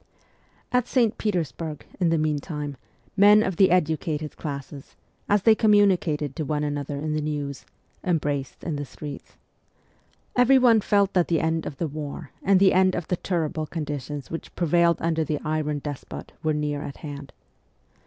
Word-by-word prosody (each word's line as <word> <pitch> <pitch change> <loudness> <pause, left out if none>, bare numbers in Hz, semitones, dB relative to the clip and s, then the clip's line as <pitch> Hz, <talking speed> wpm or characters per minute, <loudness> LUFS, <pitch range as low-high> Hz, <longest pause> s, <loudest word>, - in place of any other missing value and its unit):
At 250 -1 +2
St. 235 -4 +2
Petersburg, 165 -6 -3
in 175 -3 +3
the 165 - +2
meantime, 150 -1 -2 0.4
men 205 +2 +7
of 190 -5 -2
the 190 - +6
educated 160 -3 0
classes, 140 -2 -7 0.3
as 205 -1 +3
they 225 - +7
communicated 185 - +3
to 155 - -1
one 150 0 -1
another 145 -1 -3
the 155 +1 -1
news, 145 -2 -4 0.4
embraced 145 -6 -1
in 160 -4 -2
the 145 - -4
streets. 140 +2 -9 1.0
Everyone 245 -3 +5
felt 200 -1 +2
that 180 -2 +3
the 165 -2 +2
end 160 0 0
of 140 - -7
the 165 - -1
war 150 0 -6
and 195 -1 +4
the 195 0 +5
end 185 0 +4
of 170 - -4
the 180 - +2
terrible 160 -4 -2
condi 150 -3 -4
tions 145 +1 -7
which 165 - -7
prevailed 170 0 +3
under 165 -1 +1
the 150 0 -1
' - - -16
iron 155 -1 -1
despot 145 -1 -7
' - - -40
were 155 -1 +1
near 150 -1 -2
at 140 - -7
hand. 140 -2 -7
155 Hz, 170 wpm, -25 LUFS, 145-185 Hz, 1.0 s, men